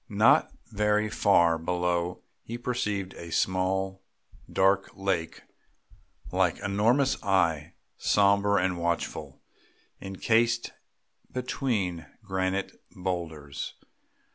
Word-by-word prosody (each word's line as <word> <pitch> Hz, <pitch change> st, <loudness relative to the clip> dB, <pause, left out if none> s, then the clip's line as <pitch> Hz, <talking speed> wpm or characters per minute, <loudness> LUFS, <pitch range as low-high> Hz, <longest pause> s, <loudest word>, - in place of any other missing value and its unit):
Not -, -, +4 dB, 0.2 s
very 105 Hz, 0 st, +1 dB
far 85 Hz, -6 st, +4 dB
below 90 Hz, +1 st, -1 dB, 0.2 s
he 115 Hz, -, -6 dB
perceived 105 Hz, -6 st, -2 dB
a 85 Hz, -1 st, -9 dB
small 95 Hz, +2 st, 0 dB, 0.5 s
dark 95 Hz, +1 st, +3 dB
lake 85 Hz, -4 st, -2 dB, 0.9 s
like 90 Hz, -2 st, +2 dB
an 100 Hz, -1 st, -4 dB
enormous 120 Hz, +7 st, +2 dB
eye, 85 Hz, -6 st, +1 dB, 0.2 s
sombre 100 Hz, 0 st, +3 dB
and 90 Hz, -2 st, +1 dB
watchful, 85 Hz, 0 st, -3 dB, 0.6 s
encased 115 Hz, +5 st, +1 dB, 0.6 s
between 110 Hz, -, -2 dB, 0.2 s
granite 95 Hz, +1 st, -2 dB
boulders. 85 Hz, -6 st, -4 dB
95 Hz, 90 wpm, -28 LUFS, 90-105 Hz, 0.9 s, Not